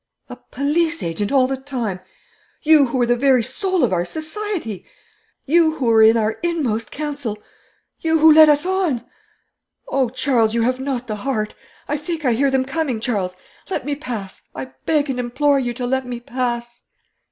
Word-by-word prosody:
'A - - -7
police 320 +4 0
agent 185 +5 -2
all 270 -2 +4
the 270 +1 -1
time! 250 -8 -4 0.6
You 305 -3 +6
who 245 - -2
were 245 - +3
the 240 0 +2
very 255 -1 +3
soul 370 - -1
of - - +2
our 175 -1 +1
society! 315 - -4 0.6
You 320 +1 +3
who 280 -5 -3
were 225 -1 +5
in 220 +1 +6
our 220 0 -1
inmost 275 -11 -1
council! 285 -7 -4 0.6
You 320 0 +2
who 320 0 +7
led 310 0 +8
us 295 +2 +3
on! 360 -11 0 0.8
Oh, 265 -3 +1
Charles, 240 -3 +1
you 230 - +2
have 255 +2 0
not 265 -2 -3
the 215 -3 -4
heart! 215 -2 -2 0.3
I 295 - -1
think 315 0 -5
I 245 - +3
hear 275 +4 +2
them 265 -1 +1
coming, 270 -3 -2
Charles. 200 -6 -2 0.3
Let 380 - -3
me 290 - -1
pass; 235 -9 -6
I 130 0 -6 0.2
beg 300 -2 +2
and 260 -2 -3
implore 275 +4 +1
you 245 -2 -2
to 245 - -3
let 260 +1 -1
me 245 -1 -5
pass.' 240 -1 -4
260 Hz, 185 wpm, -20 LUFS, 235-300 Hz, 0.8 s, led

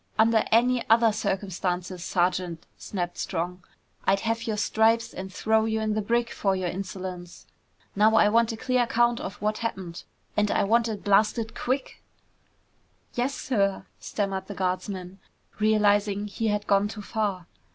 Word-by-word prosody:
"Under 220 0 +4
any 240 +2 +4
other 225 0 +5
circumstances, 185 -3 -2
Sergeant," 175 -2 -1
snapped 175 -3 -4
Strong, 180 0 -3 0.4
"I'd 195 0 +2
have 225 0 -2
your 215 -2 -1
stripes 225 +2 +2
and 190 0 -7
throw 220 +3 +2
you 220 0 0
in 215 -1 0
the 215 - 0
brig 235 +3 0
for 195 -2 0
your 185 -1 -2
insolence! 185 -1 -6 0.5
Now 215 +2 +4
I 210 - +6
want 230 +2 +3
a 225 - -6
clear 255 +2 +1
account 240 0 +2
of 190 - -5
what 215 0 0
happened. 190 -7 -4 0.3
And 210 0 +2
I - - +2
want 230 +3 +3
it 215 -3 -5
blasted 215 +3 +2
quick!" 260 +1 -3 1.1
"Yes, 250 +3 -1
sir!" 200 -6 0
stammered 195 -2 -3
the 205 - -7
guardsman, 185 0 -3 0.4
realizing 205 -1 +3
he 220 +2 -3
had 210 -1 0
gone 200 0 +3
too 210 0 -7
far. 200 -5 -2
210 Hz, 155 wpm, -26 LUFS, 190-225 Hz, 1.1 s, I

